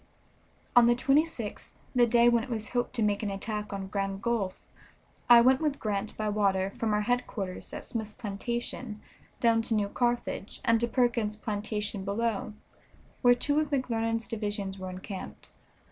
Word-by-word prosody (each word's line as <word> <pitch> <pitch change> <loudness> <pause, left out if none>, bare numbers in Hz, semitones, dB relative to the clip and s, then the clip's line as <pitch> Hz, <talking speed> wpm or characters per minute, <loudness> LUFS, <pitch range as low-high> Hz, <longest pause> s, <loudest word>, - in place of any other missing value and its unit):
On 240 -1 +8
the 240 - +5
26th, 270 -4 0 0.2
the 245 -2 +5
day 235 +1 +5
when 235 -1 +4
it 255 - -8
was 220 -3 -3
hoped 245 -1 -1
to 230 - +1
make 205 -1 +1
an 210 - -1
attack 210 +2 -4
on 195 -1 -4
Grand 195 0 -2
Gulf, 225 -6 -1 0.7
I 240 -1 +10
went 260 +3 +4
with 300 -3 0
Grant 210 0 -2
by 215 - -1
water 195 -2 +1
from 220 +1 -2
our 210 - +2
headquarters 210 -5 -2
at - - -6
Smith's 220 -2 -4
plantation 230 +1 -4 0.4
down 230 -1 +4
to 225 0 -1
New 205 -1 +1
Carthage 240 -3 -1
and 230 0 +4
to 235 - +1
Perkins's 230 -4 +1
plantation 210 -1 -3
below, 210 +1 -1 0.7
where 245 -1 +6
two 285 +4 +1
of 305 -2 0
McClernand's 230 -4 -1
divisions 205 -3 -3
were 185 0 -5
encamped. 185 +1 -8
225 Hz, 165 wpm, -29 LUFS, 205-240 Hz, 0.7 s, I